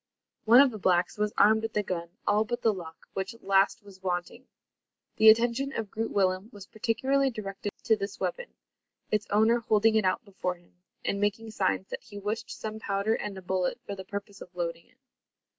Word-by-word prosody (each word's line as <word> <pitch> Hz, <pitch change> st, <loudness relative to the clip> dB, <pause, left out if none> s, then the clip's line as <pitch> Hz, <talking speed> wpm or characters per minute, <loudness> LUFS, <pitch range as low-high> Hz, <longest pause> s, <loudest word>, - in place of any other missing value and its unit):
One 235 Hz, +4 st, +8 dB
of 280 Hz, -2 st, +4 dB
the 215 Hz, -, -7 dB
blacks 180 Hz, +1 st, +1 dB
was 210 Hz, 0 st, +1 dB
armed 220 Hz, +2 st, +5 dB
with 225 Hz, -1 st, -3 dB
a 210 Hz, -, +2 dB
gun, 170 Hz, -3 st, -4 dB, 0.2 s
all 210 Hz, +1 st, +3 dB
but 240 Hz, +2 st, -4 dB
the 225 Hz, -, +4 dB
lock, 165 Hz, -4 st, -10 dB
which 195 Hz, +4 st, -4 dB
last 195 Hz, +1 st, +2 dB
was 195 Hz, -2 st, -15 dB
wanting! 185 Hz, +7 st, -3 dB, 0.7 s
The 220 Hz, 0 st, +8 dB
attention 240 Hz, +5 st, +4 dB
of 220 Hz, -5 st, -4 dB
Groot 225 Hz, +1 st, -2 dB
Willem 190 Hz, +1 st, +1 dB
was 205 Hz, -4 st, -11 dB
particularly 260 Hz, +6 st, +1 dB
directed 205 Hz, -3 st, -5 dB
to 220 Hz, -, +4 dB
this 200 Hz, -1 st, -5 dB
weapon, -, -, -3 dB, 0.6 s
its 210 Hz, -1 st, 0 dB
owner 220 Hz, +3 st, +4 dB
holding 220 Hz, 0 st, +3 dB
it 220 Hz, -1 st, +3 dB
out 185 Hz, +5 st, 0 dB
before 185 Hz, -2 st, -3 dB
him, 175 Hz, 0 st, -25 dB, 0.3 s
and 200 Hz, -, -1 dB
making 215 Hz, +2 st, -1 dB
signs 190 Hz, -2 st, 0 dB
that -, -, -5 dB
he 205 Hz, -, -12 dB
wished 210 Hz, +3 st, -3 dB
some 220 Hz, 0 st, -6 dB
powder 200 Hz, +1 st, 0 dB
and 205 Hz, -3 st, -4 dB
a 190 Hz, -, -9 dB
bullet 180 Hz, 0 st, -1 dB
for 200 Hz, -, -5 dB
the 190 Hz, -1 st, -7 dB
purpose 200 Hz, +1 st, -7 dB
of 180 Hz, -, -12 dB
loading 170 Hz, -1 st, -4 dB
it. -, -, -30 dB
205 Hz, 200 wpm, -28 LUFS, 190-220 Hz, 0.7 s, One